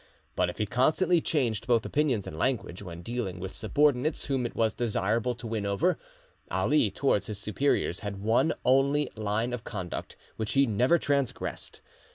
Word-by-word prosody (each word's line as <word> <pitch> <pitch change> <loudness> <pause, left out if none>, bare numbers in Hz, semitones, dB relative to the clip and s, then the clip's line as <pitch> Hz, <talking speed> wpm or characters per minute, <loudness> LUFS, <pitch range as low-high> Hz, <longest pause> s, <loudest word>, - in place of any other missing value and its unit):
But 90 -1 +2
if 90 - -7
he 105 - 0
constantly 160 - +2
changed 120 -9 0
both 120 -3 +3
opinions 135 -9 +1
and - - -7
language 105 -2 -1
when 85 -3 -8
dealing 115 -6 -3
with 95 +1 -6
subordinates 145 - +1
whom 130 -3 0
it - - -12
was 110 -2 +2
desirable 115 +1 0
to 120 +1 -10
win 110 -2 -2
over, 100 - +1 0.5
Ali 150 -8 +2
towards 100 -2 +1
his 105 - -4
superiors 105 -2 0
had 100 -1 -5
one 110 +10 +2
only 135 +2 +3
line 110 +3 -1
of 120 -2 -4
conduct 95 -6 -5 0.2
which 110 -1 -2
he 140 0 +5
never 125 +8 +3
transgressed. 140 -5 -2
115 Hz, 170 wpm, -28 LUFS, 100-135 Hz, 0.5 s, he